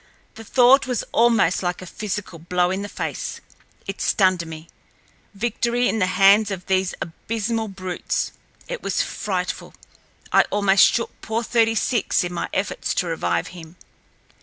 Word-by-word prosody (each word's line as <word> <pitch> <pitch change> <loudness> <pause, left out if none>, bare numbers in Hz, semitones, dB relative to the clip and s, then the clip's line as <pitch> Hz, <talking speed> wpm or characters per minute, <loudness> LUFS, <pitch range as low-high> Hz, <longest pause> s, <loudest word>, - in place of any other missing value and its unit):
The 225 - -10
thought 255 +4 +5
was 250 -3 -1
almost 230 -7 +3
like 175 -1 -2
a 185 - -8
physical 200 -2 -5
blow 180 +2 0
in 190 +1 -2
the 205 - -5
face—it 195 0 -7
stunned 185 -3 +2
me. 160 0 -9 0.7
Victory 240 +3 0
in 225 - 0
the 185 - +2
hands 200 +3 +5
of 190 -2 -5
these 190 -1 0
abysmal 225 +5 -3
brutes! 185 -2 -3 0.4
It - - -5
was - - 0
frightful. - - -4 0.6
I - - +6
almost 200 -1 +5
shook 230 - -3
poor 225 +2 -2
Thirty 225 0 +2
six 230 -3 +1
in 175 0 -4
my 175 - -3
efforts 195 0 -2
to - - +1
revive 90 - -1
him. 165 -1 -12
195 Hz, 150 wpm, -22 LUFS, 180-225 Hz, 0.7 s, I